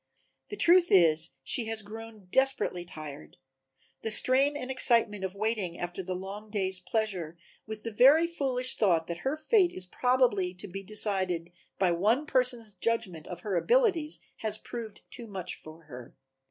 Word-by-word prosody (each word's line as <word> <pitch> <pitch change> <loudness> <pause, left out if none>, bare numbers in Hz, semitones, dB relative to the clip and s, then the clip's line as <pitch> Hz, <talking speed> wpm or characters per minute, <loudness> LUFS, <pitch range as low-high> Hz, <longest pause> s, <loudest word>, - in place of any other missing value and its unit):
The 415 - -6
truth 350 -1 +5
is 165 -3 +5
that - - -26
she 230 - 0
has 220 -1 0
grown 220 -1 -10
desperately 265 -9 +1
tired, 145 - -10 0.6
the 220 - -3
strain 270 +6 +4
and 260 -2 -5
excitement 230 -6 +4
of 190 0 -4
waiting 210 -4 -2
after 175 +2 -4
the 185 0 -4
long 200 +3 -8
day's 190 -3 -1
pleasure 180 -5 -3 0.3
with 215 -1 -7
the 230 - -4
very 275 +9 +6
foolish 265 -6 +1
thought 170 -6 +2
that 170 0 -6
her 270 +8 -1
fate 380 +1 +3
is 185 - -8
probably 205 -4 +1
to 180 - -6
be 195 +1 -7
decided 185 -4 -2 0.3
by 185 -2 +2
one 215 - +1
person's 250 -6 -1
judgment 195 -5 -2
of 175 -1 -8
her 200 -1 -3
abilities 370 - +2 0.2
has 215 -1 -3
proved 225 -2 -8
too 235 - -7
much 185 -3 -5
for 155 +1 -13
her. 125 -5 -12
210 Hz, 165 wpm, -29 LUFS, 180-250 Hz, 0.6 s, very